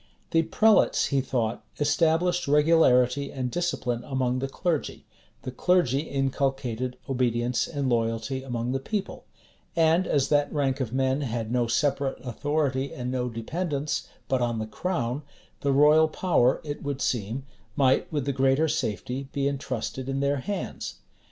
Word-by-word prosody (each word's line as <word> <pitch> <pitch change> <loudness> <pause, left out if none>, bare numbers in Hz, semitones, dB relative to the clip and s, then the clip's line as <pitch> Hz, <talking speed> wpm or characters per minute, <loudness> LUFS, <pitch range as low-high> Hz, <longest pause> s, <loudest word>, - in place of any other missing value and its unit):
The 165 - +4
prelates, 215 +7 +3
he 140 -2 +2
thought, 120 -3 -2 0.2
established 165 +4 +2
regularity 140 -3 +4
and 130 -2 -3
discipline 125 -8 -1
among 130 -2 -1
the 135 - -2
clergy; 160 +2 -2 0.4
the 130 - -4
clergy 140 -2 +2
inculcated 135 -4 -1
obedience 125 -2 0
and 140 -3 -2
loyalty 115 +2 0
among 120 -2 -3
the 135 - 0
people; 195 +8 -4 0.5
and 165 +2 +3
as 140 -2 +1
that 145 -1 +2
rank 140 -2 0
of 125 -5 -2
men 130 +2 +1
had 115 -4 -3
no 120 -1 +1
separate 140 +2 0
authority 140 +1 -1
and 125 0 -4
no 125 -1 -1
dependence 145 +5 -3 0.2
but 130 -1 +1
on 120 -1 0
the 110 - -2
crown, 125 0 -2 0.4
the 140 - 0
royal 150 +3 +6
power, 155 -6 +2
it 145 -1 -5
would 140 -1 -3
seem, 120 +1 -2 0.3
might 135 -2 +2
with 145 -4 -1
the 140 - 0
greater 135 +4 +3
safety 135 -1 -3
be 140 0 0
intrusted 130 -1 -3
in 135 0 -1
their 140 +1 +1
hands. 200 +10 -4
135 Hz, 150 wpm, -26 LUFS, 125-150 Hz, 0.5 s, royal